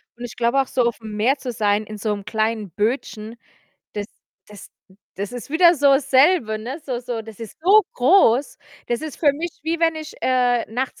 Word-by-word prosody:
und 240 - -7
ich 235 - -9
glaube 240 +3 +2
auch, 265 - -4
so 250 - 0
aufm 225 -2 -3
Meer 250 +7 +2
zu 255 -2 -5
sein 210 -1 0
in 215 0 -8
so 210 0 -1
'm 200 -1 -6
kleinen 215 -1 -1
Bötchen, 220 - -3 0.6
das 205 -1 -4 0.4
das 210 -2 -13 0.5
das 200 +4 -5
ist 245 +1 -7
wieder 345 +2 +5
so 290 -2 +1
dasselbe, 270 -3 +3
ne? 255 +8 -6
So 250 -3 -3
So, 240 -2 -5
das 220 -1 -13
ist 225 -3 -9
so 410 +5 +6
groß. 265 - +3 0.3
Das 240 0 -2
ist 315 -3 -6
für 290 -3 +3
mich 330 +4 -4
wie 325 +2 -1
wenn 325 -1 +3
ich, 310 -1 -7
äh, 245 -2 +2
nachts 255 +2 -3
245 Hz, 200 wpm, -21 LUFS, 220-285 Hz, 0.6 s, so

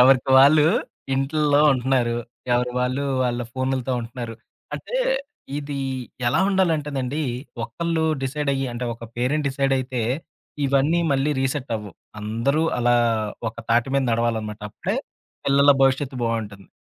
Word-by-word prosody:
ఎవరికి 130 +1 +5
వాళ్ళు, 150 +3 +7 0.5
ఇంటుల్లో 145 +2 +2
ఉంటన్నారు. 125 -2 +1 0.4
ఎవరి 125 0 +1
వాళ్ళు, 130 +3 0 0.2
వాళ్ళ 120 0 -1
ఫోనులతో 130 -1 -1
ఉంటున్నారు. 115 0 -6 0.4
అంటే, - - -4 0.6
ఇది 145 -1 -5 0.5
ఎలా 120 - +3
ఉండాలంటేనండి? 150 -7 0 0.4
ఒకళ్ళు 165 +6 -1 0.2
డిసైడయ్యి, 140 0 -1
అంటే 120 +1 -4
ఒక 115 0 -10
పేరెంట్ 140 +5 0
డిసైడయితే? 135 -2 0 0.6
ఇవన్నీ 140 +5 +2
మళ్ళీ 135 +2 +1
రీసెట్ 135 -1 -2
అవ్వువు. 105 -2 -9 0.3
అందరూ 115 +9 0 0.2
అలా, 120 0 +3 0.5
ఒక 115 - -11
తాటి 115 +2 +3
మీద 135 - +2
నడవాలనమాట. 110 -2 -1
అప్పుడే - - -3 0.5
పిల్లల 140 +1 +5
భవిష్యత్తు 135 0 +2
బావుంటుంది. 110 -4 -3
130 Hz, 120 wpm, -23 LUFS, 120-140 Hz, 0.6 s, వాళ్ళు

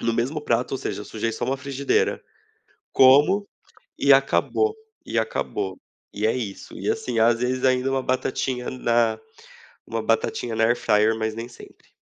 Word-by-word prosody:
no 115 - 0
mesmo 125 +7 -1
prato, 120 -3 -1
ou 135 - -1
seja, 105 - -4
sujei, 115 +2 -3
só, 110 - -3
uma 135 +1 -1
frigideira. 140 0 -1 0.7
Como, 145 +10 +5 0.5
e - - +4
acabou. 430 0 +2 0.3
E 115 - -1
acabou. 100 -3 -3 0.3
E 105 +1 -1
é 110 - +1
isso. 105 -6 -6
E - - -1
assim, 120 -3 -2
às 115 +1 +4
vezes, 125 +1 -1
ainda, 130 0 +2
uma 135 - 0
batatinha 130 -1 -2
na 115 -3 +1 0.7
uma 115 0 -3
batatinha 115 +1 -1
na 110 - +2
Air 120 +2 +2
Fryer, 110 +1 +2
mas 110 0 -2
nem 115 +1 -6
sempre. 120 - -16
120 Hz, 165 wpm, -23 LUFS, 110-130 Hz, 0.7 s, Como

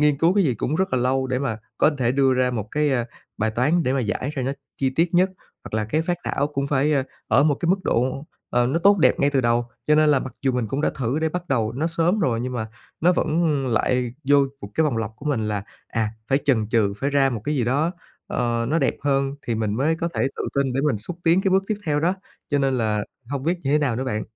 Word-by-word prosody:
nghiên 150 -1 +4
cứu 170 +4 +3
cái 200 - +3
gì 130 -6 +1
cũng 135 +7 -2
rất 190 -1 0
là 130 - +2
lâu 130 +2 +1
để 130 -1 -1
mà 130 -5 -2 0.2
có 155 - +5
thể 120 -1 +2
đưa 135 -1 +3
ra 125 0 +2
một 110 -4 -4
cái, 150 0 +1
à, 120 -2 +1 0.3
bài 110 +1 +1
toán 140 +10 +2
để 130 -3 0
mà 135 - +1
giải 125 +4 -2
ra 135 - -2
nó 135 - -1 0.2
chi 135 -1 0
tiết 165 +6 0
nhất, 185 +2 +4 0.3
hoặc - - -7
là 110 -1 0
cái 155 +9 0
phác 175 +1 -1
thảo 140 - 0
cũng 140 -2 -2
phải, 145 +2 +2
ơ, 140 - +2 0.3
ở 125 +6 +5
một 150 -2 +3
cái 170 - -3
mức 190 +2 +3
độ, 130 +5 0 0.2
ờ, 120 0 +2
nó 150 +6 +1
tốt 200 +2 +5
đẹp - - +3
ngay 140 +1 +3
từ 135 - +2
đầu. 120 0 +2 0.2
Cho 150 - +3
nên 155 0 +4
là 140 - +3
mặc 130 - -6
dù 135 - +2
mình 125 -3 -1
cũng 135 +5 -2
đã - - +1
thử 130 +3 -1
để 160 0 +1
bắt 175 +1 -5
đầu 115 -5 0
nó 150 +6 -1
sớm 170 +5 +1
rồi, 120 -9 +1
nhưng 125 +1 -3
mà 110 -3 -3 0.3
nó 175 +3 +4
vẫn 165 0 +1 0.2
lại 125 +1 0
vô 145 - +6 0.2
một 100 - -7
cái 160 - +3
vòng 140 -6 0
lặp 110 -1 -2
của 145 - -10
mình 110 -8 0
là, 105 -2 -2 0.3
à, 110 -2 -1 0.2
phải 135 - +3
chần 110 -6 +2
chừ, 110 -4 +2
phải 140 +1 0
ra 135 -1 +3
một 115 - -3
cái 150 +2 -1
gì 125 - +1
đó, 140 +7 +1 0.4
ờ, 120 -1 -1
nó 160 +3 +2
đẹp 135 - +1
hơn 135 -1 +1
thì 115 - -2
mình 110 -2 -1
mới 145 +7 +1
có 170 +1 -2
thể - - +1
tự - - -3
tin 140 -2 +1
để 135 - 0
mình 145 -8 +1
xúc 165 +11 -5
tiến 170 +3 +4
cái 195 - +1
bước 190 +1 +4
tiếp 215 - -1
theo 150 -1 +1
đó. 175 +4 +2 0.4
Cho 145 - +2
nên 135 -1 +1
là 105 -2 0 0.3
hông 140 -2 -2
biết 170 +4 0
như 135 - -1
thế 150 - +4
nào 130 -6 0
nữa 130 - -2
bạn. 110 -4 -2
135 Hz, 285 wpm, -23 LUFS, 120-155 Hz, 0.4 s, vô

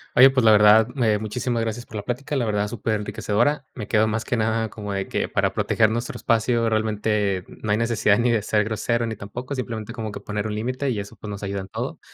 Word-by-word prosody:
oye, 130 +2 +9
pues, 130 -2 +1
la 110 - +8
verdad, 105 +1 +7
me 115 -6 +2
muchísimas 115 +2 -2
gracias 115 +2 -4
por 115 - -11
la 105 - -3
plática, 125 +6 -3
la 130 -4 +1
verdad, 105 -1 0
súper 110 0 -2
enriquecedora, 115 +7 0
me 105 -5 -6
quedo 110 -1 +3
más 110 +1 -1
que 125 - -1
nada, 110 0 0
como 105 -1 -6
de 100 -1 -2
que - - -1
para - - 0
proteger 110 -1 +2
nuestro 120 +2 -3
espacio, 115 0 +1
realmente 105 -3 0
no 110 - -5
hay 105 - +3
necesidad, 115 -2 +2
ni 120 +1 +2
de 115 -3 +1
ser 105 0 +2
grosero, 115 +2 -1
ni 110 - -4
tampoco, 120 +7 -6
simplemente 115 -5 -5
como 110 -2 -5
que - - -7
poner 105 0 -4
un 110 - -2
límite 130 +5 -2
y 110 - -2
eso, 100 - -7
pues, 105 - -9
nos 100 -1 -6
ayuda 100 -1 -3
en 95 - -10
todo, - - -5
110 Hz, 240 wpm, -23 LUFS, 105-120 Hz, -, oye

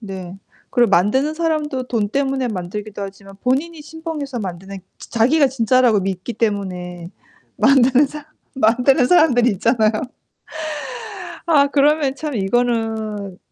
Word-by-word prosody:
네. 190 -3 -8 0.3
그리고 240 -2 +3
만드는 260 - +2
사람도 310 -5 -1
돈 220 -4 0
때문에 270 +1 -1
만들기도 205 +1 -5
하지만 195 0 -9
본인이 300 +6 -1
신봉해서 305 -4 -6
만드는 190 -1 -6 0.2
자 - - -12
자기가 280 +6 +4
진짜라고 245 -3 +3
믿기 190 +4 -4
때문에 180 -6 -3 0.5
만드는 270 +1 +4
사 295 +1 -9 0.3
만드는 250 +2 +3
사람들이 250 -8 +4
있잖아요. 220 +2 +2 1.6
아 290 -4 +4
그러면 285 -1 +2
참 300 -1 -5
이거는 220 -2 -1
240 Hz, 295 characters per minute, -19 LUFS, 200-280 Hz, 1.6 s, 자기가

